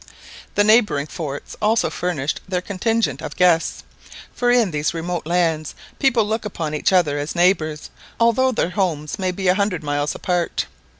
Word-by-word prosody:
The 205 - +4
neighbouring 210 -9 +4
forts 150 -3 -6
also 220 +2 +2
furnished 155 -5 -2
their 185 -1 0
contingent 225 +5 -1
of 155 -1 -6
guests, 175 -2 +2 0.5
for 245 - 0
in 240 -6 +3
these 150 +2 -1
remote 170 0 -3
lands 165 -3 0 0.2
people 250 -6 +3
look 220 +2 -2
upon 165 -7 -4
each 150 - +1
other 155 -6 +2
as 145 +4 -4
neighbours 170 -4 +1 0.3
although 235 +3 +3
their 180 -7 -1
homes 170 -6 -2
may 185 -1 0
be 185 +1 -3
a 180 - +6
hundred 195 -4 -1
miles 145 0 -1
apart. 175 -2 -1
180 Hz, 165 wpm, -21 LUFS, 155-210 Hz, 0.5 s, a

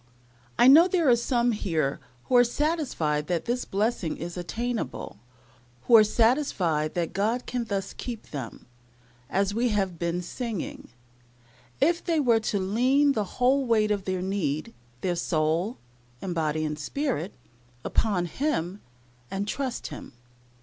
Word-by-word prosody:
I 245 - +6
know 315 +6 +9
there 350 -4 +1
are 240 - +7
some 240 0 +1
here 160 -10 -1 0.2
who 255 - 0
are 245 - +8
satisfied 240 - -1
that 175 -2 -1
this 245 +1 -1
blessing 200 -4 -1
is 170 +1 -6
attainable, 185 - -4 0.6
who 235 - +5
are 220 - +9
satisfied 210 - +1
that 170 -2 -1
God 225 +5 0
can 245 -2 -2
thus 195 -3 -3
keep 235 -3 -7
them, 135 -6 -7 0.6
as 200 +1 +1
we 240 +3 +1
have 195 -5 -1
been 170 +1 -1
singing, 225 +1 -5 0.9
if 335 +5 +2
they 335 -3 +1
were 240 -5 +4
to 215 -1 -1
lean 250 +9 +3
the 220 -6 0
whole 260 +3 +3
weight 215 -2 +3
of 200 -2 -1
their 185 -1 -2
need 160 -6 -2 0.3
their 180 -2 0
soul, 170 +6 0 0.4
and 180 +4 -4
body, 155 -1 0
and 150 0 -3
spirit 205 - -2 0.5
upon 195 -6 +1
Him, 195 - -2 0.5
and 200 +1 -3
trust 265 +1 -3
Him. - - -9
210 Hz, 145 wpm, -26 LUFS, 175-245 Hz, 0.9 s, know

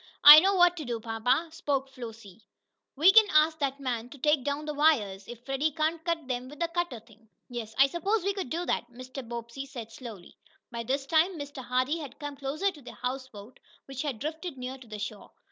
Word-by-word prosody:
"I 295 +1 +13
know 390 +4 +2
what 355 -1 +5
to 315 - -4
do, 240 -2 -3
papa," 240 +8 0
spoke 285 -5 -2
Flossie. 225 -5 -11 0.5
"We 320 +7 +7
can 435 +1 +7
ask 310 +1 +4
that 275 -1 -1
man 245 -3 -3
to 280 - -12
take 300 0 +2
down 285 +2 -2
the 300 - -3
wires, 215 -11 +2
if 240 0 -10
Freddie 270 +3 0
can't 315 +2 -1
cut 330 -4 -2
them 250 0 -3
with 295 - -12
the 335 - 0
cutter 345 -8 -2
thing." 225 0 -22 0.2
"Yes, 230 -3 -6
I 270 - +7
suppose 385 +8 -1
we 400 +1 0
could 385 -10 -5
do 340 +5 -2
that," 240 - -1
Mr. 255 +2 -8
Bobbsey 235 +3 -7
said, 235 -5 -8
slowly. 225 -8 -10 0.4
By 235 -1 -4
this 270 +4 -2
time 325 +5 +2
Mr. 285 -2 -7
Hardee 255 +6 0
had 285 -5 -8
come 290 -1 -6
closer 290 +8 -1
to 305 -5 -15
the 250 - -10
houseboat, 250 -3 -6 0.3
which 270 -1 -6
had 285 -6 -3
drifted 315 +4 -5
near 255 +1 -6
to 250 - -14
the 215 -1 -7
shore. 210 0 -6
270 Hz, 215 wpm, -28 LUFS, 240-315 Hz, 0.5 s, I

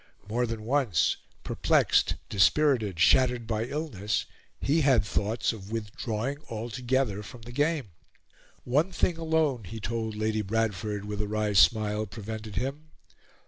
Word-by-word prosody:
More 120 +3 0
than 115 -1 -4
once, 125 - +2 0.3
perplexed, - - +2
dispirited, 105 - +3
shattered 125 +5 +4
by 110 0 -1
illness, 125 - -2 0.3
he 155 +4 +2
had 130 -8 +4
thoughts 105 +3 0
of 100 -2 -10
withdrawing 115 +4 -3
altogether 120 0 -1
from 110 +3 -11
the 120 - -9
game. 145 - 0 0.7
One 150 +9 +1
thing 175 -2 0
alone, 160 -7 +1
he 110 +5 -7
told 110 0 -3
Lady 110 0 0
Bradford, 105 -1 -1
with 105 0 -3
a 105 - -3
wry 105 0 0
smile, 105 +1 +4
prevented 110 0 -7
him. 140 +5 -3
115 Hz, 135 wpm, -28 LUFS, 105-130 Hz, 0.7 s, shattered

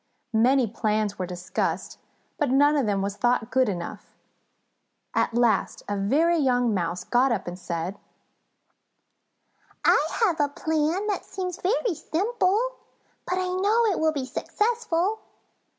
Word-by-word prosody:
Many 250 +4 +4
plans 215 -2 -1
were 185 - -2
discussed, 180 0 -3 0.4
but 295 -4 +1
none 290 +3 +4
of 275 -6 +1
them 200 -1 0
was 200 0 -2
thought 240 -1 +1
good 260 -3 +3
enough. 175 -3 -5 1.1
At 230 - +1
last 235 -4 +1
a 205 - -1
very 305 +13 +2
young 245 -4 +2
Mouse 180 -1 -2
got 250 +2 +2
up 210 -5 -1
and 175 +1 -6
said: 175 +2 -4 1.9
"I - - +5 0.2
have 345 -7 0
a 290 -1 +2
plan 315 +6 0
that 415 -1 -1
seems 365 -2 -5
very 425 +2 +1
simple, 425 +8 0 0.5
but 365 - 0
I 370 0 -1
know 410 +6 +2
it - - -1
will 315 0 +3
be 280 -4 -3
successful. 425 - -1
275 Hz, 140 wpm, -25 LUFS, -, 1.9 s, I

